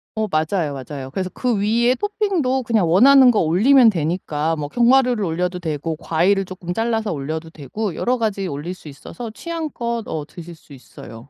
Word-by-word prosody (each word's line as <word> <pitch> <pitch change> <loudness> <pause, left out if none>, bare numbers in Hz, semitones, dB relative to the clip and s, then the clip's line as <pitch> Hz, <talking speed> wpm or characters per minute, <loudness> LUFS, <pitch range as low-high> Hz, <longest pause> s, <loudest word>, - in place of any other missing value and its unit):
어 220 0 -1
맞아요, 155 -2 -1
맞아요. 135 0 -7
그래서 185 +4 -3
그 250 -2 -1
위에 235 +4 +2
토핑도 370 - -1
그냥 215 -8 +1
원하는 255 +7 +7
거 220 - +1
올리면 225 - +5
되니까 160 -2 -1
뭐 145 -1 -4
견과류를 245 - +3
올려도 180 +1 -2
되고 160 -1 -3
과일을 185 +5 +1
쪼끔 180 -1 -6
잘라서 225 0 -1
올려도 160 +3 -5
되고 170 - -5
여러 250 +1 0
가지 205 -4 -2
올릴 150 +4 -5
수 170 - -14
있어서 225 - -9
취향껏 245 -6 -4
어 155 -2 -4
드실 170 -1 -11
수 155 -2 -18
있어요. 120 -1 -13
185 Hz, 375 characters per minute, -20 LUFS, 160-235 Hz, -, 원하는